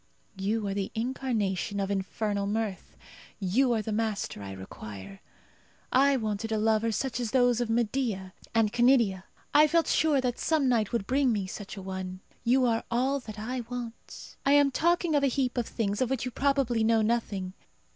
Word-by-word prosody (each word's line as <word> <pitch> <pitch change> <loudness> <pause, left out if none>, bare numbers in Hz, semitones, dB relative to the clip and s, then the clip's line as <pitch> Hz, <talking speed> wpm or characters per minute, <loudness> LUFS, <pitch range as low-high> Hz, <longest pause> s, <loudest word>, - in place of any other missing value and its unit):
You 205 +3 -1
are 195 - -1
the 195 -1 -2
incarnation 220 -5 -1
of 195 0 -1
infernal 200 +1 -1
mirth. 210 -2 -3 0.4
You 230 +7 +2
are 220 -2 0
the 220 - -4
master 215 - -2
I 100 -1 -7
require. 95 0 -9 0.7
I 275 +1 +4
wanted 220 -1 -3
a 220 - +1
lover 220 +1 +2
such 250 +2 -2
as 240 -2 -2
those 245 -1 +3
of 240 - -1
Medea 225 -5 -1 0.2
and 220 -2 +3
Canidia. 240 -6 +3 0.3
I 305 +1 +7
felt 335 +2 +2
sure 305 -3 +3
that 250 -2 -1
some 310 -4 +2
night 230 -5 +2
would 230 -4 -1
bring 265 +1 +2
me 205 -4 -1
such 195 +1 -7
a 195 - -7
one. 185 -1 -5 0.2
You 250 +2 +3
are 225 -2 +1
all 260 +4 +1
that 220 -4 -9
I 245 +5 -3
want. 240 -2 -8
I 275 - +4
am 285 -1 +5
talking 340 +3 +2
of 290 - +3
a 280 - +3
heap 255 -1 0
of 245 -3 -1
things 205 -1 -2
of 255 - +1
which 265 -2 -1
you 250 - -3
probably 265 -3 +1
know 225 0 +3
nothing. 210 -5 -1
225 Hz, 185 wpm, -28 LUFS, 200-255 Hz, 0.7 s, I